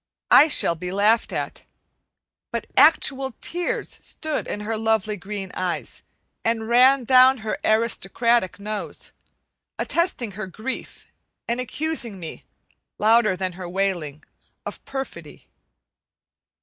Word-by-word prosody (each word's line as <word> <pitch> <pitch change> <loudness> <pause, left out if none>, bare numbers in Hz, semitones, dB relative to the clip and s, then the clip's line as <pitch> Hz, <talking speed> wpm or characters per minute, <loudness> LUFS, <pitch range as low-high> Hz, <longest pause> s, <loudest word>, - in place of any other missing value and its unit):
I 305 - +8
shall 265 - +3
be 180 +2 -6
laughed 210 +4 +2
at, - - -4 0.9
but - - -3
actual 265 -2 +4
tears 350 0 -3
stood 310 -1 -3
in 205 - -4
her 220 +2 -2
lovely 220 -1 0
green 195 -1 -6
eyes 180 -2 -3 0.4
and 225 -1 0
ran 255 +3 +5
down 255 +2 +6
her 215 - -2
aristocratic 230 -1 +1
nose, 210 +1 -6 0.7
attesting 340 - 0
her 205 0 -6
grief 215 +8 -6 0.4
and 235 +1 -1
accusing 255 -5 -3
me, 165 -2 -8 0.5
louder 215 -2 +4
than 185 0 -2
her 180 0 -7
wailing, 175 -6 -2 0.4
of - - -7
perfidy. 270 0 -7
220 Hz, 115 wpm, -23 LUFS, 195-255 Hz, 0.9 s, I